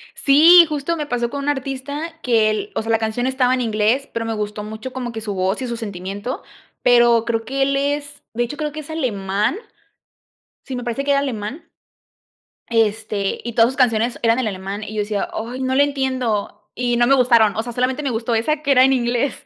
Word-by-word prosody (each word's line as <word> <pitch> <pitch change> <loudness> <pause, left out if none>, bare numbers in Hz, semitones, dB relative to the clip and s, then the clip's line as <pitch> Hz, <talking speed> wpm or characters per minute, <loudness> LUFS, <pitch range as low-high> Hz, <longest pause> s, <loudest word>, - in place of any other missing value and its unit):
Si, 330 +5 +7
justo 300 +2 -2
me 300 - -3
pasó 240 -4 -1
con 280 +2 -5
un 290 - 0
artista 285 +3 -4
que 225 -3 +3
el 395 - -3
o - - 0
sea, 225 +1 -3
la 225 - +4
canción 225 +3 -1
estaba 260 -1 +2
en 255 - 0
inglés, 225 +4 0
pero 230 0 -2
me 225 - -2
gustó 210 -1 -4
mucho 220 +4 -7
como 250 -2 -4
que 225 - -6
su 210 -2 -4
voz 190 +5 -1
y 255 - -3
su 235 -1 -4
sentimiento, 200 +2 -5 0.4
pero 240 -2 +4
creo 225 -1 -1
que 270 +3 -3
él 275 0 +1
es, 290 +1 -2
de 240 +2 0
hecho, 240 +5 -6
creo 300 -1 -3
que 310 +1 -6
es 295 - -14
alemán. 210 - -1 1.1
Sí, 260 - -6
me 245 - -4
parece 240 +3 -3
que 285 - 0
era 280 - +4
alemán, 260 +1 -5 1.0
este, 220 -3 0
y 235 - -4
todas 230 +1 +4
sus 265 - -9
canciones 235 -2 +1
eran 230 +1 +3
en 250 -4 0
alemán, 195 +1 -5
y 215 - -7
yo 215 - -1
decía: 205 -1 -2
"Ay, 240 +4 -5
no 260 0 0
le 285 - +5
entiendo", 260 -6 -2
y 245 0 0
no 240 0 +3
me 275 - +5
gustaron. 235 -5 +4
Osea, 230 +2 -3
solamente 255 +4 -1
me 275 - -1
gustó 230 +1 -1
esa 295 +7 0
que 285 - -1
era 255 -1 +6
en 270 - +4
inglés. 245 +1 -1
240 Hz, 220 wpm, -20 LUFS, 220-275 Hz, 1.1 s, Si